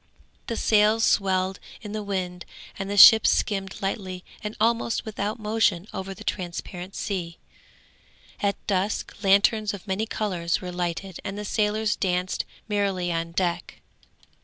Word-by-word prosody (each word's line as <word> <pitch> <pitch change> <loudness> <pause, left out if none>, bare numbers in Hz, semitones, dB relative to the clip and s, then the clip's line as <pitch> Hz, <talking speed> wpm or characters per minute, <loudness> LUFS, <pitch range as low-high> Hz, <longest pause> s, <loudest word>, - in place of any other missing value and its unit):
The 230 - -3
sails 215 +1 +3
swelled 190 -2 +2 0.2
in 210 - -6
the 215 0 -3
wind 185 -3 -3 0.4
and 195 0 -3
the 205 - -2
ship 220 +2 +10
skimmed 195 -2 0
lightly 185 -2 -3 0.2
and 210 0 -5
almost 230 +1 +1
without 210 -1 -3
motion 210 -4 +1
over 190 0 -5
the - - -11
transparent 180 +1 -5
sea. 180 -5 -3 1.0
At 200 -1 +1
dusk 200 +1 -1
lanterns 200 +2 +3
of 195 - -12
many 205 +3 -1
colours 180 -7 -1
were 180 -1 -6
lighted 175 +1 -4
and 195 0 -5
the 210 - -5
sailors 210 0 +1
danced 180 -1 -1 0.2
merrily 195 -4 0
on 165 0 -3
deck. 175 -1 -2
195 Hz, 140 wpm, -25 LUFS, 180-210 Hz, 1.0 s, ship